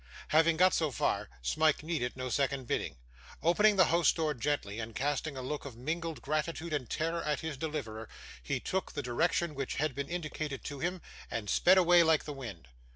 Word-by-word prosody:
Having 160 +1 +4
got 185 +2 +5
so 160 -2 +2
far, 130 - -1
Smike 155 - +2
needed 155 -7 -2
no 130 0 -3
second 135 0 0
bidding. 115 - -2 0.5
Opening 205 +6 +5
the 185 - +6
house 170 0 +4
door 155 -2 0
gently, 115 -5 -2
and 115 0 -6
casting 145 +1 -1
a 130 - -4
look 145 +3 -3
of 130 -5 -9
mingled 160 +4 -3
gratitude 155 +2 -2
and 130 -6 -2
terror 165 +2 -1
at 150 -2 -1
his 160 -2 -4
deliverer, 130 -8 -4 0.3
he - - -2
took 190 0 -2
the 145 - -3
direction 160 +6 +1
which 135 -2 -3
had 150 -1 0
been 140 +2 -4
indicated 155 -4 -4
to 145 -2 -6
him, 175 +3 -2 0.3
and 105 -3 -3
sped 185 +2 +5
away 175 -1 +7
like 160 -2 +4
the 150 - -5
wind. 110 - -8
150 Hz, 195 wpm, -32 LUFS, 130-165 Hz, 0.5 s, away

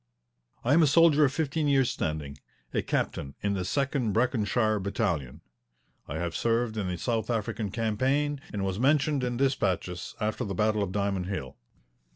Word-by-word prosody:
I 125 - +3
am 165 - +6
a 155 - +5
soldier 155 0 +6
of 135 - +1
fifteen 155 0 -1
years' 135 -3 +3
standing, 75 -2 -3 0.3
a - - +1
captain 70 -1 -2
in 100 0 +1
the 95 -2 -1
Second 135 0 0
Breconshire 110 -2 +1
Battalion. 90 - -2 0.7
I 70 - -5
have 85 -1 -3
served 115 -1 +1
in 105 -3 -2
the 90 -1 -2
South 115 +1 -1
African 110 -2 -2
Campaign 130 +7 0
and 100 -2 -2
was 95 +1 -2
mentioned 140 +1 +2
in 120 -1 -1
despatches 95 -9 -1
after 110 +3 -1
the 100 -4 -4
battle 105 +2 +2
of 100 -2 -1
Diamond 100 -2 -1
Hill. 90 -10 -4
110 Hz, 170 wpm, -28 LUFS, 95-135 Hz, 0.7 s, am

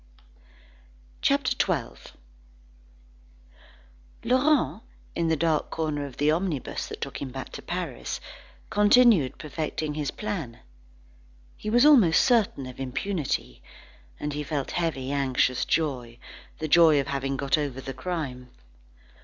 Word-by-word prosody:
CHAPTER - - +2
XII - - -2 2.1
Laurent, 255 -1 +2 0.3
in 170 - 0
the 160 - +2
dark 160 -1 0
corner 150 -3 -2
of 130 - -13
the 150 +1 +3
omnibus 160 -5 -2
that - - -8
took - - -5
him 140 - -4
back 130 0 -7
to - - -8
Paris, 60 - -4 0.5
continued 210 - +5
perfecting 155 0 -4
his 150 -2 -2
plan. 180 - -5 0.9
He 215 - -5
was 240 +5 +5
almost 230 - +6
certain 220 - +2
of 130 0 -10
impunity, 140 +5 -3 0.6
and 150 0 -3
he 150 - -3
felt 145 -2 -3
heavy, 155 -6 -2
anxious 130 -2 +1
joy, 125 -7 -1 0.4
the 155 - -3
joy 155 -1 +6
of 140 - -1
having 135 0 -2
got 135 -1 +1
over 145 -4 -3
the 135 0 -6
crime. 130 -8 -5
150 Hz, 125 wpm, -26 LUFS, 135-175 Hz, 2.1 s, almost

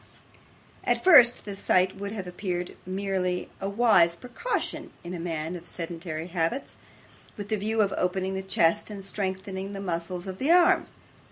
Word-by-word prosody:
At - - +1
first 255 -10 +7
sight, 190 -2 +2
this 195 - -15
would 200 0 -3
have 205 -4 -5
appeared 180 -1 -4
merely 185 -1 -2
a 195 - -1
wise 200 -6 +4
precaution 250 - -3
in 175 +1 -6
a 175 - -4
man 165 0 -3
of 175 0 -9
sedentary 165 -1 -5
habits, 175 +8 -2 0.6
with 205 -1 -6
the 215 - +2
view 215 +2 0
of 195 - -1
opening 185 +1 -1
the 190 - -2
chest 190 -2 +1
and 200 -2 -7
strengthening 190 0 -4
the 195 - -5
muscles 175 -1 -3
of 190 -1 -6
the 275 - 0
arms. 350 0 +4
190 Hz, 165 wpm, -27 LUFS, 175-205 Hz, 0.6 s, first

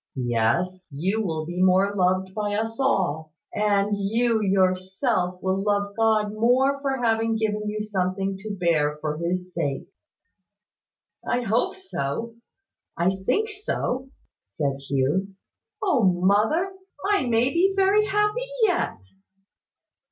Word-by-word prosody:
Yes, 130 +10 0
you 185 +10 -1
will 160 -4 -2
be 175 +2 -3
more 190 +2 +4
loved 185 0 +1
by 205 0 -2
us 225 +2 -3
all; 175 - 0 0.2
and 205 -1 +1
you 225 +3 +1
yourself 185 0 +1
will 190 +1 0
love 205 -1 0
God 220 -2 +2
more 255 +5 +2
for 270 -3 -1
having 225 0 +2
given 210 -1 -1
you 210 0 -3
something 195 -1 -1
to 215 +2 -7
bear 150 -4 +1
for 150 0 -3
his 180 +1 -3
sake." 145 -5 -2 1.4
"I 245 - 0
hope 230 - 0
so, 230 - -4 0.6
I 175 +2 +2
think 195 - -1
so," 270 -10 -3 0.3
said 135 +8 -3
Hugh. 150 +9 0 0.5
"O 365 -11 +2
mother! 205 - +2 0.3
I 400 -10 +2
may 240 +2 +2
be 365 +3 +3
very 400 +2 +4
happy 420 +5 0 0.2
yet." 365 -5 +1
200 Hz, 125 wpm, -24 LUFS, 180-235 Hz, 1.4 s, more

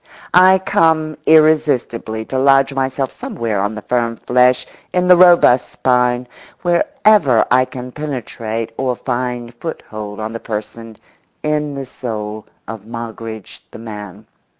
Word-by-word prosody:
I 185 +2 +7
come 160 -5 +1
irresistibly 150 -8 +2
to 130 - -2
lodge 135 0 +4
myself 135 0 -2
somewhere 110 -4 -3
on 100 +2 -2
the 105 - -8
firm 120 -2 -1
flesh, 125 +2 +2 0.3
in 180 0 +1
the 180 - +8
robust 175 -8 +5
spine, 125 -1 +1 0.4
wherever 175 - +3
I 130 +1 +4
can 125 0 -8
penetrate 115 -6 -5
or 130 -2 -1
find 120 -1 -4
foothold 110 -7 -7
on 110 +1 -4
the 115 - -5
person, 110 0 -7 0.5
in 150 -1 -1
the 135 -1 -5
soul, 110 -4 -6 0.2
of 110 -1 -8
Moggridge 115 -2 -8
the - - -11
man. 105 -4 -9
125 Hz, 130 wpm, -17 LUFS, 115-150 Hz, 0.5 s, the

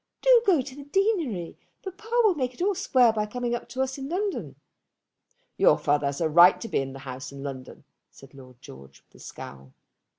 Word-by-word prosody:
Do - - +6
go 345 -8 +4
to 260 +1 -10
the 285 -1 -11
deanery. 310 - -1 0.2
Papa 405 +4 -10
will 425 -4 +4
make 255 -5 -3
it - - -10
all 405 +2 +2
square 250 - +3
by 210 -1 -2
coming 240 +2 -3
up 240 - -5
to 260 +2 -1
us 265 +1 -5
in 270 +1 -6
London." 390 +3 -3 1.0
"Your - - +5
father 145 -1 0
has 140 0 -4
a 165 - +1
right 175 +4 +6
to 230 - -6
be - - -1
in 135 0 -4
the - - -9
house 130 0 -7
in 140 0 -9
London," 135 -2 -8 0.3
said 135 0 -17
Lord 130 -3 -15
George 65 0 -14
with - - -40
a - - -18
scowl. 65 -1 -11
235 Hz, 210 wpm, -26 LUFS, -, 1.0 s, Do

